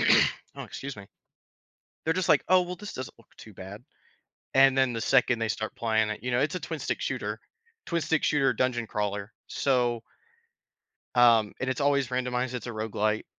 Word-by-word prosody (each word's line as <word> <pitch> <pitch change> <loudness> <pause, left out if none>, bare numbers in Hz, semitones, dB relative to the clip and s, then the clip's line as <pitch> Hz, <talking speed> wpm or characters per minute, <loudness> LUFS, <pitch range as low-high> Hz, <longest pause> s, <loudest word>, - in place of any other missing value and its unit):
oh, - - +2
excuse 140 -2 -7
me. 100 -1 -10 1.0
They're 160 +1 +1
just 185 -1 -1
like, - - +4
"Oh, 185 0 +6
well, 180 0 -5
this 210 +1 -8
doesn't 130 -1 -7
look 115 - -23
too 110 - -13
bad," 95 +5 -10 0.7
and 135 0 +6
then 130 -2 +3
the 115 - -3
second 125 -2 +3
they 115 - -1
start 110 0 -3
playing 110 -2 +1
it 105 0 -5
you 125 - -2
know, 120 - +2
it's 145 +6 0
a - - -2
twin-stick - - -4
shooter - - -3 0.5
twin-stick 160 -2 0
shooter 140 -3 +3
dungeon 120 -3 0
crawler, 105 -1 -3 0.2
so 120 -4 +1 1.1
um, 115 -4 +5
and 130 - -1
it's 130 +1 -2
always 140 -2 +2
randomized, 125 0 -1
it's 125 -2 -5
a - - -4
roguelite, 110 -1 -1
125 Hz, 180 wpm, -28 LUFS, 110-135 Hz, 1.1 s, Oh